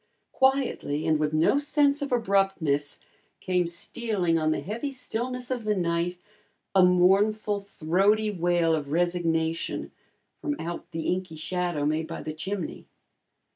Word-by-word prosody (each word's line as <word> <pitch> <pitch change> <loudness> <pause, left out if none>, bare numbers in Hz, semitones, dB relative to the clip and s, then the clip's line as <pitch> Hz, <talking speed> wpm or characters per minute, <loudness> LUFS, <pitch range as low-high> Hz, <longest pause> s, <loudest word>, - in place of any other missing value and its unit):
Quietly 265 - +1
and 155 -1 +2
with 150 0 +1
no 160 - +3
sense 290 0 +2
of 280 - -3
abruptness, 195 - +1 0.4
came 180 -2 0
stealing 175 -1 -1
on 155 0 +1
the 155 - +1
heavy 235 - -4
stillness 250 0 -4
of 245 -3 -2
the 210 0 +1
night, 170 0 0 0.6
a 190 -1 +6
mournful, 200 +4 +3
throaty 200 +3 +1
wail 175 -3 +2
of 145 -3 -2
resignation 165 -1 0 0.5
from 290 -1 -2
out 170 +1 -5
the 165 -2 -4
inky 180 -2 -2
shadow 175 -1 -2
made 155 +2 0
by 165 - -6
the 155 - -4
chimney. 175 +2 -5
180 Hz, 135 wpm, -27 LUFS, 165-215 Hz, 0.6 s, a